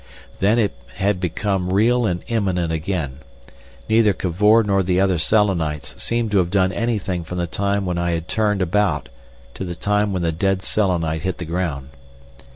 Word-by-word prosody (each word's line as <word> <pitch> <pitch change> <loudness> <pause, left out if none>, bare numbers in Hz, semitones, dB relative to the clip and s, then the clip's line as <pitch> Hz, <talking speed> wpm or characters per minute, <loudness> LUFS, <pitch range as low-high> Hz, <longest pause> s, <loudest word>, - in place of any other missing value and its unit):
Then 105 +4 +3
it 110 -4 +1 0.2
had 100 -1 0
become 90 +1 -1
real 115 +4 +3
and 90 -1 -2
imminent 95 -8 0
again. 80 -5 -3 0.7
Neither 110 -2 +4
Cavor 105 +6 +3
nor 100 -2 +2
the 90 0 +1
other 95 -3 +2
Selenites 85 -7 +1
seemed 115 -2 -1
to 100 - +4
have 90 -2 +1
done 95 -1 +2
anything 100 -6 -2
from 90 +3 -6
the 90 - 0
time 100 +3 -1
when 90 -1 -1
I 85 0 0
had 85 +1 -3
turned 105 -3 +1
about 100 -6 0 0.4
to - - -6
the 90 -2 -5
time 105 +4 0
when 90 -2 -2
the 85 - +1
dead 95 +3 0
Selenite 85 -7 0
hit 95 -1 -2
the 85 - -5
ground. 80 -5 -3
95 Hz, 175 wpm, -21 LUFS, 85-105 Hz, 0.7 s, Neither